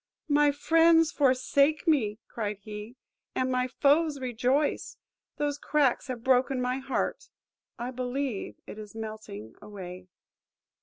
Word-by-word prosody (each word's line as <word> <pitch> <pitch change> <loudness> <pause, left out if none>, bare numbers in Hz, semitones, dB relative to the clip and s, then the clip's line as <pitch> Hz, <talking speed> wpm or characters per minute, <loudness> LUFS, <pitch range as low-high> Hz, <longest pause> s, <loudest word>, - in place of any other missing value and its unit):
–"My 295 -1 +4
friends 325 +2 +4
forsake 280 +3 +2
me," 225 -10 +2
cried 210 -3 -4
he, 210 +2 -8 0.4
"and 255 0 0
my 250 0 +1
foes 285 +3 +2
rejoice! 255 +3 0 0.4
Those 290 -1 -1
cracks 290 -3 +1
have 245 -3 -5
broken 260 0 +3
my 250 +1 -1
heart! 270 0 -2 0.5
I 245 +2 -4
believe 255 -2 -3
it 215 - -9
is 210 0 -10
melting 215 - -7
away." 185 -3 -9
255 Hz, 120 wpm, -28 LUFS, 220-285 Hz, 0.5 s, My